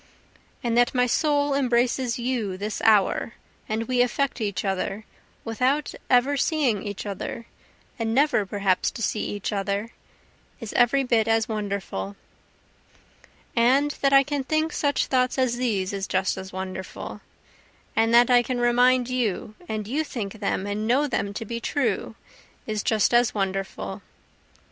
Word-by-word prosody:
And 235 -1 0
that 245 +2 +2
my 250 0 +4
soul 285 +2 +1
embraces 245 -2 +1
you 235 -6 -2
this 210 +2 -4
hour, 215 +1 +3 0.3
and 220 +1 -1
we 250 -1 +2
affect 260 +1 0
each 205 -1 -2
other 195 +2 -2 0.4
without 255 +6 0 0.2
ever 260 +3 +4
seeing 270 - +1
each 205 0 -6
other, 205 +3 -5 0.5
and 225 -1 -1
never 275 -2 +3
perhaps 195 -2 +1
to - - -8
see 210 - -1
each 205 +1 -3
other, 200 +2 -2 0.7
is 230 -4 -7
every 250 +3 +4
bit 230 -4 +2
as 225 -1 +2
wonderful. 200 - -4 1.4
And 265 +5 +4
that 275 - +3
I 275 0 +7
can 285 0 -2
think 310 +3 0
such 285 -1 +1
thoughts 255 0 +1
as 255 -2 +1
these 205 -6 -1
is 195 -1 -3
just 190 0 0
as 190 0 -8
wonderful, 190 0 -6 0.7
And 225 +1 +3
that 240 +1 +6
I 245 -1 +7
can 245 0 -3
remind 245 +1 +4
you, 235 -5 -2 0.2
and 215 -1 -3
you 290 +7 0
think 220 -7 -6
them 200 -1 -1
and 205 +2 -2
know 265 +5 +3
them 200 -7 -2
to 225 - -4
be 235 +2 -4
true, 230 -5 -1 0.5
is 215 -1 -2
just 220 +2 +2
as 240 -1 +3
wonderful. 195 -1 -3
230 Hz, 155 wpm, -25 LUFS, 205-255 Hz, 1.4 s, I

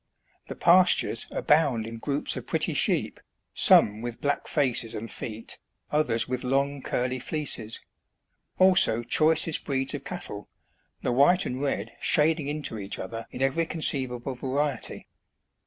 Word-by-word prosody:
The - - -7
pastures 175 -9 +3
abound 140 -7 +1
in 115 0 -8
groups 140 +3 -2
of - - -7
pretty - - -1
sheep, - - 0 0.3
some 105 +1 +5
with 120 -1 -6
black 145 0 -2
faces 125 -6 0
and 115 +2 -6
feet, 110 0 -5 0.3
others 125 -7 +2
with 125 0 -3
long, 140 +2 -1
curly 125 0 -2
fleeces; 125 -7 0 0.8
also 185 -11 +4
choicest 155 +5 +1
breeds 135 0 -1
of 140 -2 -5
cattle, 175 - -8 0.5
the - - 0
white 145 +9 +4
and 130 +2 -4
red 115 -6 -2
shading 155 -1 +2
into 145 -7 -3
each 100 0 -5
other 115 +4 -7
in 130 - -4
every 160 +5 0
conceivable 130 -5 -1
variety. 135 +1 -3
135 Hz, 140 wpm, -26 LUFS, 115-150 Hz, 0.8 s, some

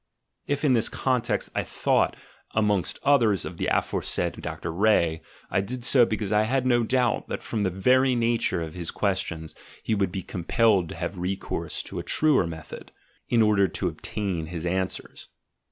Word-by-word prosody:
If, 145 +1 -1
in 135 - +4
this 115 -3 +2
context, 125 -3 -1
I - - 0
thought, - - +1 0.4
amongst 105 -4 +1
others, 115 -9 +3
of - - -7
the - - -1
aforesaid - - -1
Dr. 80 - -5
Ree, 85 -4 +2 0.3
I 95 - +2
did 125 +5 -5
so 125 -2 +5
because 105 -2 -2
I 105 - +4
had 130 +4 0
no 120 -2 +3
doubt 125 +1 +1
that - - -5
from 110 - -3
the 100 - +2
very 125 +8 +3
nature 115 -7 +1
of 80 -1 -7
his 85 -2 -4
questions 95 -5 -2 0.3
he - - 0
would 100 -4 +1
be 95 -1 -4
com 90 - -6
pelled 100 -7 +3
to - - -7
have 95 - -4
recourse 95 +2 -3
to - - -6
a - - -4
truer 150 - +3
method, 80 -2 -9 0.4
in 115 -2 +4
order 105 -2 +4
to 80 - -2
ob - - -13
tain 95 -7 -2
his 85 0 -5
answers. 95 +1 -3
105 Hz, 185 wpm, -26 LUFS, 90-120 Hz, 0.4 s, so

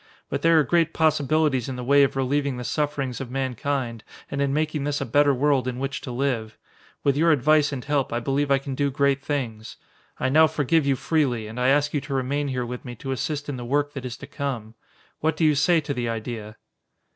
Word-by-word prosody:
But - - -2
there 165 0 +5
are - - +4
great 165 +3 +1
possibilities 155 -4 +2
in 130 - -4
the 125 - -5
way 140 +3 +5
of 140 - +2
relieving 135 0 0
the 125 - -5
sufferings 140 -2 -2
of 130 - -6
mankind 130 -2 -2 0.3
and 140 - -2
in 140 -1 +1
making 150 0 -1
this 145 0 -1
a - - -2
better 145 +4 +4
world 135 -1 +2
in 125 -1 -3
which 135 +2 -3
to 130 - -6
live. 120 -4 -2 0.5
With 140 -1 +3
your 165 +3 +4
advice 150 +1 +3
and 130 -3 -5
help 145 -2 0
I 120 - 0
believe 140 +3 0
I 140 - +5
can 135 0 -5
do 140 +1 0
great 140 0 +1
things. 115 -7 -4 0.4
I 130 - +1
now 155 +4 +6
forgive 150 0 +1
you 135 - +3
freely 130 -6 0
and 110 +3 -7
I 125 - +2
ask 145 +2 +3
you 145 - 0
to 140 0 -4
remain 140 +2 -1
here 125 -2 -2
with 125 +1 -6
me 125 -2 -7
to 135 +4 -6
assist 145 +2 -3
in 140 -3 -4
the 120 - -6
work 145 +4 0
that 135 - -6
is 125 -2 -5
to - - -9
come. 125 -7 -4 0.5
What 160 0 0
do 165 - +2
you 155 - +5
say 165 +4 +3
to 145 -1 -3
the 120 -3 -2
idea?" 110 -1 -5
140 Hz, 235 wpm, -24 LUFS, 125-145 Hz, 0.5 s, now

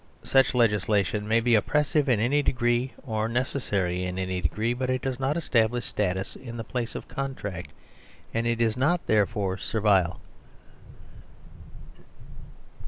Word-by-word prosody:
Such 135 -1 +3
legis 105 -5 +3
lation 105 0 +1
may 115 +2 +2
be 120 +1 +2
oppressive 150 +6 +2
in 120 -4 +3
any 135 +7 +2
degree 120 -1 +1
or 110 -5 -1
necessary 105 -8 -1
in 90 0 -3
any 95 -1 -2
degree, 110 +8 0
but 130 +1 -3
it 130 -1 -1
does 130 -1 -2
not 135 +4 0
establish 120 -6 +1
status 95 -2 -2
in 120 -2 -8
the 115 - -4
place 120 +1 -4
of - - -6
contract, 100 - -5 0.6
and 115 +1 0
it 115 -1 0
is 115 -1 +2
not, 155 +7 +1
therefore, 100 -2 +1
servile. 100 -5 +1
115 Hz, 145 wpm, -26 LUFS, 100-130 Hz, 0.6 s, Such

